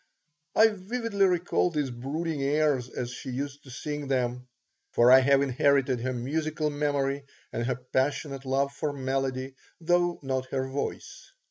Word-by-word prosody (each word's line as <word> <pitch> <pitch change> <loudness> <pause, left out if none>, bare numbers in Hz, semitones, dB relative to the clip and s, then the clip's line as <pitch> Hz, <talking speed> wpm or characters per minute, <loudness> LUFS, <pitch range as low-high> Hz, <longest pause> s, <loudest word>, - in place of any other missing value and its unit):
I 220 +1 +7
vividly 205 0 0
recall 180 0 +1
these 150 -5 -1
brooding 145 +5 -3
airs 140 -3 +1
as 120 0 -4
she 125 - -7
used 140 +3 -5
to - - -12
sing 145 +3 -5
them, 125 -1 -1 0.4
for 120 +1 +5
I 130 - +10
have 140 +1 +4
inherited 135 -1 +2
her 130 +2 -2
musical 155 +5 -1
memory 145 -1 0 0.3
and 120 +1 -1
her 125 - 0
passionate 135 +2 -1
love 135 +1 +1
for 145 0 -2
melody, 135 -1 -2 0.3
though 175 +1 +2
not 130 -1 -2
her 130 0 -2
voice. 135 +2 -5
140 Hz, 150 wpm, -28 LUFS, 130-155 Hz, 0.4 s, I